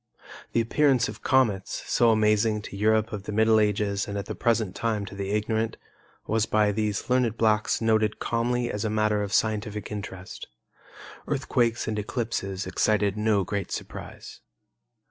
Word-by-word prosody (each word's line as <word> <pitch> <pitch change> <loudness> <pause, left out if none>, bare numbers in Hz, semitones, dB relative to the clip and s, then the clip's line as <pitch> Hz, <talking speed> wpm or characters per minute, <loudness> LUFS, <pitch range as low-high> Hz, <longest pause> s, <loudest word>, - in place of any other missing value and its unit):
The 115 - +3
appearance 130 +1 +2
of 105 - -9
comets, 115 -8 +1
so 120 - +3
amazing 105 0 +2
to 100 - -8
Europe 110 +2 +2
of 100 -1 -5
the - - -4
Middle 110 +1 +4
Ages 105 -1 0
and 100 0 -4
at 100 - -4
the - - -5
present 115 -5 0
time 110 -2 -1
to 100 - -10
the 100 0 -4
ignorant, 110 +2 -1 0.5
was 110 0 +1
by 105 -1 +3
these 105 0 -2
learned 125 -3 +1
blacks 110 -1 +2
noted 110 -1 +2
calmly 120 +1 -1
as 105 - -3
a 110 - 0
matter 110 -1 +1
of 100 -1 -3
scientific 105 -1 -1
interest. 95 -3 -7 0.8
Earthquakes 120 -4 0
and 110 -1 -1
eclipses 105 -4 -3
excited 105 -2 +1
no 105 -2 +2
great 100 +1 -4
surprise. - - -8
110 Hz, 160 wpm, -26 LUFS, 105-115 Hz, 0.8 s, Middle